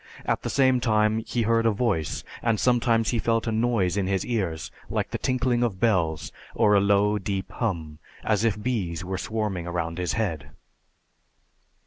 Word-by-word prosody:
At - - 0
the - - -3
same 130 -2 +3
time 110 -2 +2
he 120 - 0
heard 115 +1 +2
a - - +4
Voice, 100 -8 -1 0.2
and 115 -3 +1
sometimes 115 -2 +2
he 120 - 0
felt 115 0 +1
a 115 - -1
noise 110 -5 +1
in 95 -2 0
his 95 -1 0
ears 95 -10 -2 0.2
like - - -2
the - - -3
tinkling 125 -1 +1
of 110 -6 0
bells 85 - +1 0.2
or 105 - +4
a 100 - +6
low 100 +1 +3
deep 95 -1 -3
hum, 80 -9 -3 0.2
as 105 0 +1
if 110 -3 +1
bees 95 -9 -2
were 95 0 -3
swarming 105 -6 -2
round 85 0 -3
his 90 -1 -1
head. 85 -10 -2
105 Hz, 175 wpm, -25 LUFS, 95-115 Hz, 0.2 s, a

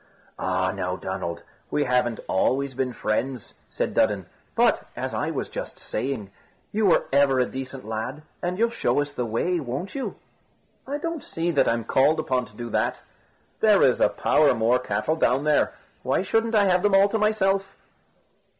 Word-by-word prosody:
"Ah, 95 0 0
now, 90 -1 -3
Donald, 95 -3 -5 0.3
we 150 - +1
haven't 125 -3 +1
always 135 +7 +1
been 130 0 -1
friends," 120 +2 -2 0.2
said - - -2
Dudden, - - +2 0.3
"but, - - +3
as - - -4
I - - -1
was - - -3
just - - -6
saying, 120 -7 -4 0.4
you 215 0 +2
were 180 - +4
ever 140 -2 +4
a 125 - +3
decent 130 0 -7
lad, 115 +7 -4 0.2
and 180 +1 -2
you'll 230 +2 +2
show 230 - +1
us 145 0 -2
the 125 -4 -2
way, 170 +11 0
won't 145 +7 -4
you?" 270 - -4 0.7
"I 285 +2 -2
don't 330 0 -4
see 170 +1 -2
that 145 - +3
I'm 115 0 +1
called 135 +7 +3
upon 125 -1 0
to 105 - -17
do 120 -1 -6
that; - - 0 0.6
there - - +5
is - - +3
a - - +5
power 150 -4 +3
more 115 +2 +3
cattle 110 +6 -1
down 135 -2 +2
there. 150 -1 +2 0.3
Why - - 0
shouldn't 225 +3 +1
I 210 - +5
have 180 -2 +3
them 205 0 +3
all 195 +1 +6
to 220 - -1
myself?" 195 -2 +1
135 Hz, 180 wpm, -25 LUFS, 115-185 Hz, 0.7 s, all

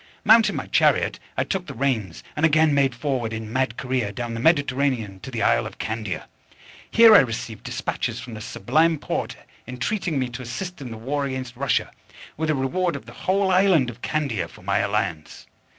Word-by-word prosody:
Mounting 225 +1 +6
my - - -3
chariot, - - +2 0.2
I - - +2
took 190 -3 -3
the - - -7
reins, 115 -9 -1
and 150 - -3
again 155 -1 +4
made 135 -3 +2
forward, 125 -4 -2
in 110 0 -6
mad 130 -2 0
career, 125 -5 -1
down 120 +2 -5
the 115 - -4
Mediterranean 130 - +1
to 135 - -8
the 120 -3 -2
isle - - +3
of - - -11
Candia. 110 -3 -4 0.6
Here 230 -1 +8
I - - +10
received 115 -3 -3
despatches - - -3
from 120 -1 -9
the 110 - -7
Sublime 160 +11 +1
Porte, - - -3 0.3
entreating 145 - -2
me 130 -1 0
to 125 +2 -7
assist 175 +8 -6
in 130 - -6
the 115 - -7
war 140 +5 -2
against 130 -2 -5
Russia, 135 +2 0 0.4
with 160 +1 -2
a 155 - +2
reward 165 +6 0
of 140 - -7
the - - -12
whole 190 0 +1
island 180 -9 +4
of 120 +1 -17
Candia 135 - -1
for - - -16
my 100 +1 +1
alliance. 100 -6 -2
130 Hz, 195 wpm, -23 LUFS, 115-155 Hz, 0.6 s, I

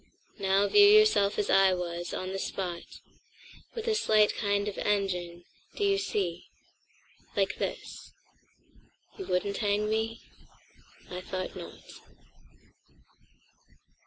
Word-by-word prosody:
Now 195 +1 +2
view 410 - +7
yourself 420 - +5
as 210 - 0
I 195 -1 +5
was, 175 -1 -4
on 185 0 -4
the 195 - -3
spot—With 190 - -8
a 445 - +3
slight 215 - +3
kind 205 -1 0
of 205 - -4
engine. 180 -4 -1 0.3
Do 415 - -2
you 395 -1 +3
see? 185 - -3 0.9
Like - - 0
this… - - -5 1.1
You 385 - -6
wouldn't 200 +2 -1
hang 205 0 0
me? 220 +1 -2 0.9
I 180 0 -5
thought 185 0 -5
not." - - -10
200 Hz, 110 wpm, -29 LUFS, 185-220 Hz, 1.1 s, view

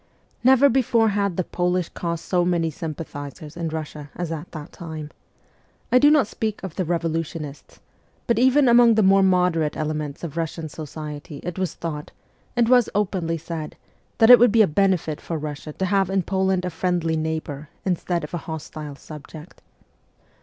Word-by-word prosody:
Never 265 +2 +6
before 235 -4 +3
had 200 -3 -1
the 185 - +1
Polish 180 0 -1
cause 170 -1 -4
so 180 -2 +1
many 170 -2 +1
sym 160 -1 -5
pathizers 145 0 -8
in 170 -1 -3
Russia 155 -2 -6
as 175 -2 -4
at 165 +1 -6
that 155 -2 -8
time. 155 -3 -7 0.8
I 250 - +6
do 290 - +6
not 300 -5 +5
speak 215 0 -4
of 190 -4 -5
the 185 - -2
revolutionists; 165 -3 -3 0.5
but 235 -1 +1
even 260 +2 +5
among 235 -1 +6
the 215 - +4
more 195 +1 +5
moderate 180 -5 +2
elements 150 -1 -3
of 165 -5 -5
Eussian 165 -1 -4
society 150 -1 -7
it 180 +1 -5
was 185 -4 -2
thought, 150 -3 -5 0.5
and 240 -1 +3
was 245 -1 +5
openly 185 -5 0
said, 160 -1 -6 0.4
that 225 +1 +7
it 245 - +11
would 245 -2 +6
be 225 0 +6
a - - +3
benefit 170 -2 +1
for 165 - -4
Russia 150 0 -6
to 190 - -2
have 195 -1 +2
in 190 -1 +1
Poland 190 0 0
a 180 - -2
friendly 165 -1 0
neighbour 155 -2 -3 0.2
instead 175 -2 -1
of 150 - -7
a - - 0
hostile 155 -2 -6
subject. 155 +3 -11
170 Hz, 175 wpm, -23 LUFS, 155-195 Hz, 0.8 s, it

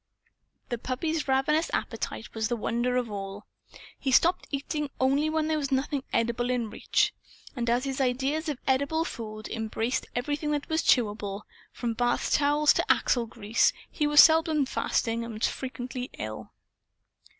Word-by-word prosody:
The 240 - -2
puppy's 305 +6 -2
ravenous 300 +5 +2
appetite 225 - -4
was 220 -1 -1
the 240 - -1
wonder 240 +2 -1
of 245 -3 -1
all. 195 0 -6 0.5
He 270 - -2
stopped 340 +7 +3
eating 290 +1 -3
only 275 +4 +2
when 315 0 0
there 315 -1 +1
was 280 -1 -3
nothing 270 +1 0
edible 235 +1 0
in 240 -4 -1
reach. - - +1 0.4
And 240 -2 -1
as 240 +2 +2
his 270 0 -2
ideas 270 +5 0
of 290 - -2
edible 280 +5 +1
food 215 -5 -6
embraced 225 +2 -2
everything 290 +5 -1
that 290 -1 -2
was 320 0 +1
chewable, 205 -4 +1 0.3
from 235 -2 -3
bath 240 +1 0
towels 295 +1 +4
to - - +2
axle 240 -2 +2
grease 225 -1 +1 0.2
he 300 - 0
was 295 0 +9
seldom 320 -2 +4
fasting 230 -2 -1
and 230 -1 -6
was 215 - +1
frequently 255 -1 -5
ill. 110 -1 -6
255 Hz, 160 wpm, -28 LUFS, 230-295 Hz, 0.5 s, was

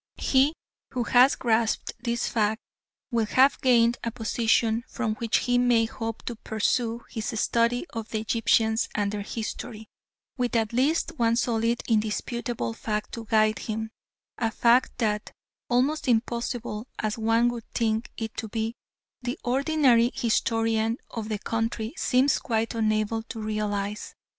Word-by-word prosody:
He 275 +4 +3 0.4
who 250 -2 0
has 250 +3 +5
grasped 225 -2 0
this 235 -1 -1
fact 220 -1 +1 0.5
will 230 -2 +1
have 265 +6 +4
gained 240 -2 +4
a 230 - 0
position 230 0 +1
from 230 -4 -2
which 230 -2 +1
he 245 -1 +3
may 240 -2 +4
hope 225 0 -5
to 235 - -4
pursue 230 +2 -1
his 225 0 -3
study 235 +4 +1
of 225 -1 -5
the 220 - -2
Egyptians 225 0 +2
and 205 -1 0
their 210 -1 -3
history, 220 +1 -5 0.5
with 245 -1 -1
at 225 -1 +1
least 280 +7 +2
one 230 -1 +3
solid, 235 -1 0
indisputable 225 - -1
fact 210 - -3
to 230 -1 -6
guide 215 -2 +3
him 220 0 -4 0.5
a 225 -2 +1
fact 235 +3 +3
that, 210 -3 -1 0.4
almost 265 +5 +1
impossible 235 -1 -1
as 215 +1 -2
one 225 +2 +3
would 235 -2 -7
think 225 -1 0
it 225 -1 -5
to 225 - -3
be, 225 +1 -2 0.5
the 245 +4 -3
ordinary 260 -2 +3
historian 225 0 +1
of 225 -2 -5
the 215 - -1
country 225 +1 -2
seems 260 +2 +2
quite 225 -1 -1
unable 215 0 0
to 225 0 -8
realise. 210 -1 -3
230 Hz, 145 wpm, -26 LUFS, 220-240 Hz, 0.5 s, has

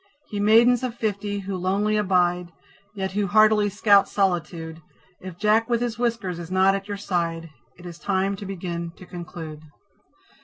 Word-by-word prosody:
Ye 205 - -3
Maidens 230 +4 +5
of 250 -3 -3
Fifty, 205 -2 -2
who 195 0 -4
lonely 195 +4 0
abide, 180 -3 +1 0.5
Yet 190 -1 -3
who 200 +1 -1
heartily 215 0 +4
scout 200 0 +4
solitude, 170 -4 -2 0.4
If 185 -2 -9
Jack 215 +3 +2
with 235 -1 +2
his 235 -2 -3
whiskers 230 -8 -1
is 170 -1 -8
not 190 +1 +4
at 195 0 -4
your 205 -1 -4
side, 170 -4 -2 0.3
It 175 - -14
is 170 -1 -9
time 195 0 0
to 200 - -8
begin 170 -3 -5
to 185 - -12
conclude. 170 -3 -8
195 Hz, 165 wpm, -24 LUFS, 175-210 Hz, 0.5 s, Maidens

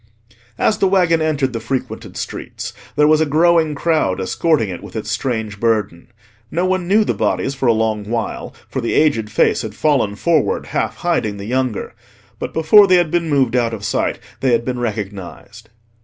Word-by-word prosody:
As 215 - +1
the 195 - +3
waggon 175 -4 +3
entered 145 -5 0
the 115 - -2
frequented 125 +4 -5
streets - - -6 0.2
there 150 - +4
was 155 0 +4
a - - +3
growing 160 0 +3
crowd 150 - 0
escorting 125 - +1
it 90 - -6
with - - -11
its - - -4
strange 110 -5 -3
burden. 110 -4 -1 0.4
No 175 +7 -1
one 185 -1 0
knew 210 +4 +4
the - - 0
bodies 135 - -1
for 135 -1 -2
a - - +6
long 110 -2 -1
while, 115 0 -3 0.2
for 130 - -4
the 115 - -1
aged 115 -9 +2
face 110 - +2
had 110 -3 -7
fallen 135 -9 +1
forward, 160 +6 +1
half - - -2
hiding 115 -12 -1
the 100 - -7
younger. 125 -1 -2 0.5
But - - -4
before 195 +6 +6
they 185 - +5
had 175 -3 +2
been 170 -2 0
moved 135 -5 +2
out 115 -2 +1
of 105 -2 -8
sight, - - -1 0.2
they 130 -2 +2
had 115 0 +1
been 125 -1 -3
recognised. 105 0 -6
130 Hz, 190 wpm, -18 LUFS, 110-160 Hz, 0.5 s, a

